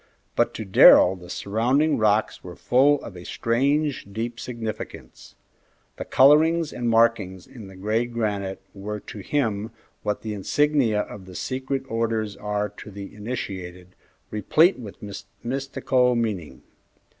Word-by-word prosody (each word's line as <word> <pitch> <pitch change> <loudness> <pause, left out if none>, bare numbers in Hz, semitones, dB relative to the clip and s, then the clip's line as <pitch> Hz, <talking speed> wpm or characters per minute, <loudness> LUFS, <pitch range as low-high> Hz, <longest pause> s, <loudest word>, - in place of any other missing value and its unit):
But - - +1
to 110 - -5
Darrell 95 -1 +7
the 90 -1 -13
surrounding 125 +9 +1
rocks 105 0 +1
were 90 -1 -9
full 140 +3 +3
of 100 - -9
a 90 - -9
strange, 140 +6 0
deep 115 +3 -4
significance. 115 -3 -7 0.6
The - - -5
colorings 155 +4 +4
and 120 -1 -2
markings 115 -5 +2
in 110 -6 -12
the 95 - -13
gray 110 +5 -1
granite 100 -5 -3
were 105 +1 -5
to 105 - -10
him 110 -2 -1 0.3
what 105 -1 -3
the 110 -1 -3
insignia 120 +1 +1
of 100 -2 -9
the 90 - -11
secret 130 +3 -3
orders 115 -2 -1
are 105 0 -2
to 105 +1 -12
the 100 -1 -9
initiated, 95 -5 -6 0.4
replete 155 - +3
with 105 -5 -9 0.5
mystical 130 -1 +1
meaning. 105 -9 -3
110 Hz, 135 wpm, -24 LUFS, 100-130 Hz, 0.6 s, Darrell